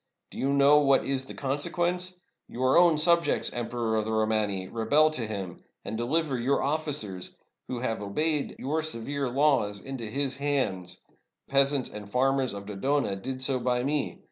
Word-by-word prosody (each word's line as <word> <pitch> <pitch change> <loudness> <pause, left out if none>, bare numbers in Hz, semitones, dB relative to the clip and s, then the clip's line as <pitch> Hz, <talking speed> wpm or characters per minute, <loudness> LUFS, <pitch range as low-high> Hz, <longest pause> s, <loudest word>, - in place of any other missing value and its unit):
Do - - -9
you 135 - +1
know 140 +1 +6
what 140 -2 +3
is 135 -1 -2
the - - -9
consequence? 175 +6 -1 0.3
Your 130 +2 +1
own 170 -2 +6
subjects, 170 +2 +3
0 120 - -3
Em - - -9
peror 115 -2 -1
of 105 - -2
the 110 - -3
Romani, 110 -3 0
rebel 145 +9 +3
to 125 -8 -3
him, 100 -5 -6 0.2
and - - -4
deliver 135 +3 0
your 135 +4 +1
offi 155 +3 -1
cers, 95 -10 -3 0.3
who 125 -2 -4
have 115 -4 -2
obeyed 150 +9 0
your 155 +4 -1
severe 140 -2 -2
laws, 130 -7 +2
into 135 -2 -6
his 135 +3 -1
hands. 130 -11 -2 0.4
The - - -26
peasants 140 -1 +3
and 105 -1 -8
farmers 130 0 +1
of 100 0 -7
Dodona 105 +2 -1
did 130 +6 -5
so 130 -1 +1
by 125 0 0
me. 145 +1 -1
130 Hz, 180 wpm, -27 LUFS, 110-145 Hz, 0.4 s, know